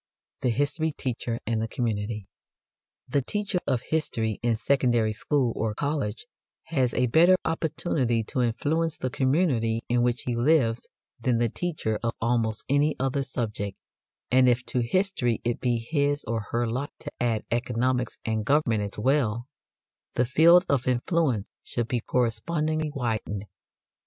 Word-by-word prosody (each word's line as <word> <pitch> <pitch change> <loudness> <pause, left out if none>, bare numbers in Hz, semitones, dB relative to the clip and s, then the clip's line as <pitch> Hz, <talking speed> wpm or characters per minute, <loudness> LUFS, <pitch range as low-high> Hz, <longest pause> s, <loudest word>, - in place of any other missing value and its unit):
THE 125 - +2
HISTORY 145 +5 0
TEACHER 120 -3 -3
AND 110 0 0
THE 115 - -1
COMMUNITY. 105 -3 -2 0.8
The 140 +2 +1
teacher 205 - -2
of 125 -1 +1
history 115 -9 -1
in 120 -1 +2
secondary 120 -2 +2
school 125 +1 0
or 110 -1 -1
college 140 - -2 0.4
has 130 -7 0
a 125 - +3
better 170 +9 +6
opportunity 150 -7 0
to 125 +4 -2
influence 150 +7 0
the 130 - -3
community 130 -6 +1
in 120 0 +2
which 120 -1 0
he 125 - -2
lives 120 -2 +2 0.3
than 120 0 +1
the 120 0 +2
teacher 150 -9 -2
of 115 -1 -1
almost 115 -2 0
any 145 +2 +2
other 135 +1 0
subject; 105 -7 -3 0.5
and 130 0 +6
if 125 +1 +1
to 125 - -1
history 120 - +1
it 120 0 -1
be 120 -2 +1
his 145 +4 0
or 110 -2 -3
her 120 +1 0
lot 130 +6 -2
to 145 - -6
add 115 -3 0
economics 125 +1 0
and 110 -1 0
government 125 -4 +2
as 100 -1 -4
well, 120 -1 +1 0.7
the 125 - +3
field 170 +8 +6
of 135 -3 +1
influence 125 - +1
should 120 -2 -3
be 125 - 0
correspondingly 150 +8 0
widened. 110 -5 -2
125 Hz, 150 wpm, -26 LUFS, 115-145 Hz, 0.8 s, better